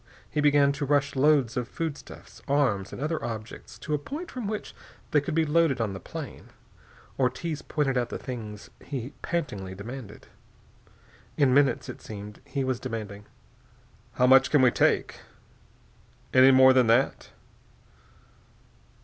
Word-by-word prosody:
He 150 - -1
began 145 -1 +4
to 140 +1 -4
rush 145 0 +1
loads 135 -3 +3
of 125 -1 -2
foodstuffs, 160 +1 -7
arms, 130 -9 +1
and - - -8
other 155 +3 -2
objects 110 0 -7
to 150 +6 -5
a 150 - +1
point 295 - -7
from 245 -5 -5
which 215 0 -5 0.4
they 150 - +4
could 150 +2 -4
be 165 -1 +3
loaded 155 -3 +2
on 110 -4 -1
the 95 - -6
plane. - - -9 0.7
Ortiz 145 +5 -1
pointed 135 -4 0
out 120 -1 -2
the - - -4
things 110 -5 -8
he 135 -1 -6
pantingly 105 - -3
demanded. 110 +1 -9 1.1
In 140 -4 +4
minutes, 140 -3 +3
it - - -8
seemed, 105 -1 -9
he 140 - -2
was 130 -2 -1
demanding: 105 -4 -6 0.9
"How 125 - +2
much 130 0 +6
can 145 -4 +4
we 125 - +6
take? - - +1 1.1
Any 130 +1 +7
more 130 0 +7
than 130 -2 +4
that?" 120 +4 +2
130 Hz, 150 wpm, -27 LUFS, 115-145 Hz, 1.1 s, Any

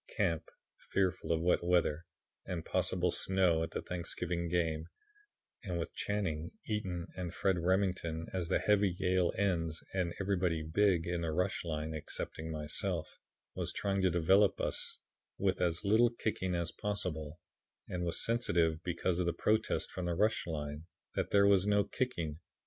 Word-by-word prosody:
Camp, 80 0 -1 0.4
fearful 90 -3 +1
of 80 -1 +2
wet 90 0 +3
weather 85 -2 +2 0.4
and 90 -4 -4
possible 90 -1 +1
snow 90 -4 +2
at 80 - -1
the - - -4
Thanksgiving 90 -1 -2
game, 80 -2 0 0.8
and 90 -5 -3
with 85 - -4
Channing, 85 -6 -2 0.2
Eaton 95 -6 -2
and 90 -2 -5
Fred 95 -3 +2
Remington 90 -3 0
as 90 -3 -1
the - - +3
heavy 100 -3 +3
Yale 90 -2 +2
ends 85 -5 0
and 90 -3 0
everybody 90 -5 0
'big' 85 +1 +2
in 85 0 -1
the 80 -1 -1
rush 90 +4 0
line 80 -1 -3
excepting 80 +1 -5
myself, 80 +2 -3 0.3
was - - -2
trying 100 -1 0
to 95 - +4
develop 95 +4 +4
us - - -1 0.4
with 95 -1 +1
as 85 -1 0
little 110 +4 +5
kicking 105 -6 -2
as 85 -1 -1
possible, 85 -7 -3 0.5
and 90 -1 -3
was 85 -1 +1
sensitive 85 -9 +2
because 90 0 0
of 90 - +1
the 85 - +1
protests 110 +1 +1
from 90 - -5
the 85 - 0
rush 105 0 +2
line 75 0 -4 0.3
that - - -1
there 100 0 +5
was 100 -1 +5
no 105 0 +4
kicking. 85 - -2
90 Hz, 160 wpm, -33 LUFS, 80-95 Hz, 0.8 s, little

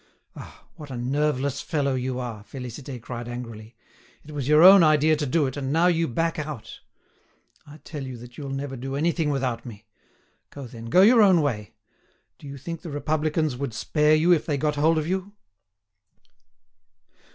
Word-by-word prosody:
"Ah! - - -12
what 150 -3 -10
a 130 - -6
nerveless 140 +2 -1
fellow 140 -3 -1
you 130 0 -2
are!" 115 -4 -6
Félicité 125 +2 -8
cried 120 +1 -7
angrily. 115 -2 -8 0.5
"It 155 - -11
was 145 -3 -4
your 150 +2 +6
own 190 +1 +10
idea 155 0 +4
to 150 -1 -3
do 150 +3 +2
it, 130 - -4
and 135 -2 -3
now 165 +3 +3
you 165 -2 +2
back 165 +6 -1
out! 145 -8 -7 0.9
I 145 +1 -12
tell 150 -2 -7
you 130 -2 -7
that 120 +1 -13
you'll 140 -2 -7
never 135 0 -4
do 135 +2 -5
anything 160 +1 0
without 130 -5 -2
me! 110 -3 -11 0.6
Go 140 -2 -9
then, 115 -1 -10
go 180 +11 +5
your 230 +2 +6
own 185 -6 +5
way. 105 -8 -3 0.6
Do 145 - -11
you 140 0 -8
think 165 +4 -7
the 170 - -8
Republicans 155 0 -1
would 125 -3 -5
spare 150 +6 +2
you 165 +3 +3
if 165 - 0
they 145 -3 0
got 150 +2 0
hold 160 +3 +2
of 155 - -1
you?" 190 +3 -3
145 Hz, 185 wpm, -24 LUFS, 125-155 Hz, 0.9 s, own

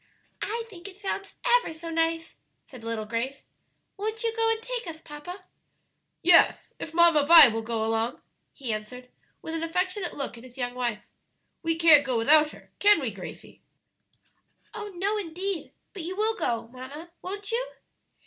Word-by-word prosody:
"I 460 +2 -2
think 375 -4 -11
it 385 -1 -12
sounds 395 -1 -4
ever - - +3
so 325 +1 -8
nice," 330 0 -1 0.3
said 250 -4 -13
little 225 -1 -3
Grace. 235 +5 -4 0.5
"Won't 435 +2 -3
you 455 -1 0
go 455 0 +3
and 450 0 +1
take 485 -2 -5
us, 320 -1 -7
papa?" 330 +5 -9 0.8
"Yes, 340 0 +5
if 315 - -6
Mamma 335 -3 +5
Vi 325 -5 +11
will 225 0 -2
go 225 -1 -2
along," 225 +1 -1 0.3
he 255 -6 -4
answered, 250 +4 -7 0.3
with 320 - -5
an 325 - -2
affectionate 360 +3 -1
look 270 -4 -5
at - - -14
his 255 0 -13
young 245 -1 -2
wife; 240 -4 -2 0.6
"we 330 -1 0
can't 320 -3 +7
go 255 -3 -1
without 300 +6 +5
her, - - -15
can 410 -2 +6
we, 260 -6 -2
Gracie?" 190 -3 -10 1.1
"Oh, 435 -1 -6
no, 400 +4 0
indeed! 375 -1 -4 0.2
but 390 - -6
you 355 +3 -5
will 435 +2 +1
go, 230 - -2
mamma, 275 +7 -10
won't 400 +3 -4
you?" - - -2
330 Hz, 170 wpm, -27 LUFS, 250-395 Hz, 1.1 s, Vi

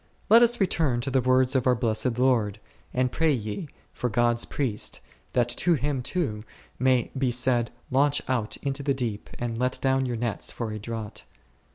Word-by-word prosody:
Let 230 +2 +9
us 240 0 +4
return 160 - +1
to 135 - -3
the 130 0 +3
words 130 +1 +3
of 130 -1 +2
our 125 - +5
Blessed 115 +1 0
Lord, 115 -5 +2 0.3
and 125 0 0
pray 160 +3 +2
ye 115 - -3 0.3
for 125 - -2
God's 120 +1 +2
Priest, 125 -7 -3 0.3
that 120 -1 +3
to 170 +8 +2
him 145 -2 -1
too 120 -8 -2 0.4
may 130 -1 +2
be 130 -1 +1
said, 120 -1 +2 0.2
Launch 140 +2 +3
out 120 -5 -1
into 140 0 -2
the 140 -1 0
deep 115 -5 -4
and 115 -1 -3
let 125 +1 0
down 135 0 +1
your 120 -1 -2
nets 115 -2 -2
for 115 -2 -4
a 110 - -5
draught. 110 -1 -6
125 Hz, 185 wpm, -26 LUFS, 115-135 Hz, 0.4 s, Let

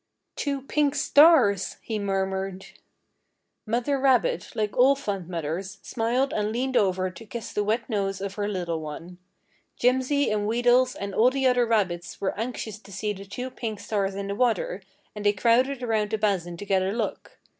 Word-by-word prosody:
"Two 280 -2 -2
pink 290 0 +1
stars!" 270 - +5
he 220 -2 -4
murmured. 190 -1 -2 1.0
Mother 245 +5 0
rabbit, 275 - +2
like 210 -1 -1
all 265 +3 +5
fond 200 -10 -4
mothers, 175 +4 -4
smiled 245 +4 0
and 210 0 0
leaned 255 +3 -2
over 185 -3 +2
to 225 - -12
kiss 225 +1 -7
the 210 - 0
wet 215 +3 -1
nose 195 -4 -1
of 195 0 -4
her 205 0 -2
little 175 -5 -2
one. 165 +4 -8 0.6
Jimsy 260 +3 +2
and 210 -1 0
Wheedles 245 +3 +3
and 200 0 -5
all 230 +5 +5
the 265 0 -1
other 250 -2 +3
rabbits 180 -6 -1
were 195 - -1
anxious 220 -2 -4
to 200 - -16
see 210 +2 -2
the 195 0 -10
two 250 +6 -6
pink 220 -4 -5
stars 200 -1 -2
in 200 0 -4
the 200 - -3
water, 215 -4 0 0.3
and 210 - -6
they 205 0 +4
crowded 250 +5 +2
around 220 -3 0
the 220 - -1
basin 185 -5 -1
to 205 - -7
get 195 -2 +2
a 190 - 0
look. 220 +2 -4
210 Hz, 180 wpm, -26 LUFS, 195-250 Hz, 1.0 s, stars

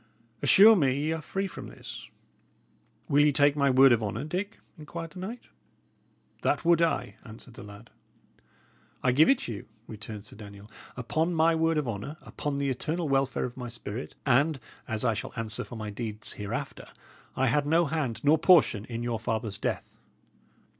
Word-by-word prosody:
"Assure 220 +3 +8
me 135 -7 +2
ye 155 +2 -1
are 160 0 -2
free 195 +5 -3
from 190 - -7
this." - - -10 1.0
"Will 145 +1 +4
ye 150 - +4
take 145 0 +3
my 140 -1 +2
word 130 +1 +6
of 115 -2 +3
honour, 110 +4 -3
Dick?" 185 +7 -4 0.2
inquired 165 +2 -8
the 185 - -10
knight. 220 +7 -6 1.0
"That - - 0
would 170 -1 +4
I," 165 -1 0
answered 115 +1 -13
the - - -11
lad. 105 +3 -12 1.1
"I 130 - +4
give 145 +6 +5
it 270 - +2
you," 105 -4 -6 0.2
returned 105 -1 -9
Sir - - -10
Daniel. 105 0 -12 0.3
"Upon 160 +8 -1
my 165 +1 +4
word 165 0 +1
of 150 -4 -1
honour, 115 +8 -5
upon 145 -1 -4
the 140 -1 0
eternal 160 +5 -2
welfare 135 -1 +1
of 125 0 -7
my 125 -1 -5
spirit, 115 +1 -7
and 140 +3 +3 0.3
as 110 0 -2
I 115 - +3
shall 110 - -6
answer 115 -2 -4
for - - -10
my 110 -2 -5
deeds 105 0 -5
hereafter, 100 -1 -5 0.5
I 130 - +1
had 145 +3 +1
no 165 +3 +3
hand 145 -6 -2
nor 150 +2 +4
portion 155 - +4
in 115 -1 -5
your 120 -2 -2
father's 110 -2 -3
death." - - -3
135 Hz, 180 wpm, -28 LUFS, 115-160 Hz, 1.1 s, Assure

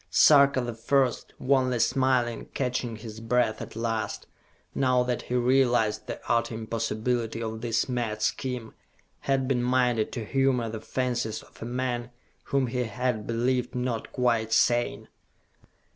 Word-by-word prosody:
Sarka 140 -3 +6
the 120 -1 -3
First, 125 +3 0
wanly 130 -2 +2
smiling, 120 -1 +1
catching 125 -3 -1
his 110 0 -9
breath 115 -1 +1
at - - -8
last, 115 -1 -2 0.5
now 125 -2 +2
that 125 -1 -1
he 125 - -4
realized 120 -3 +2
the - - -5
utter 115 0 +1
impossibility 115 +1 -2
of 110 0 -4
this 115 -1 0
mad 115 -4 -2
scheme, 125 -3 -2 0.5
had 135 -1 0
been 125 -2 +1
minded 125 -3 +1
to 115 -3 -4
humor 130 -1 +1
the 110 -1 -6
fancies 120 -1 -2
of - - -20
a - - -4
man 120 -1 -2 0.4
whom 140 -1 +1
he 125 +1 -1
had 115 0 -2
believed 125 +2 0
not 125 -2 -2
quite 115 -3 +1
sane. 120 +1 +2
120 Hz, 145 wpm, -27 LUFS, 115-125 Hz, 0.5 s, Sarka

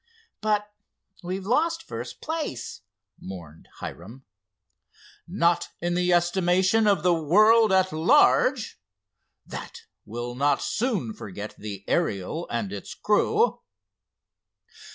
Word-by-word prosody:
"But 210 -1 +1 0.5
we've 185 +1 -4
lost 325 +9 +1
first - - -7
place!" 310 - -4 0.4
mourned 85 -4 -10
Hiram. 115 +10 -9 1.0
"Not 170 -1 +1
in 175 +1 -1
the 180 0 +1
estimation 185 +4 +3
of 195 -6 +3
the 180 -1 +4
world 210 +7 +5
at 190 -1 +3
large. 250 - +3 0.6
That - - -8 0.2
will 120 +3 -5
not 140 +2 +2
soon 205 - -1
forget 105 +1 -8
the 100 -2 -7
Ariel 160 - -1
and 110 -4 -3
its 100 - -7
crew." 430 - +2
175 Hz, 105 wpm, -25 LUFS, -, 1.0 s, world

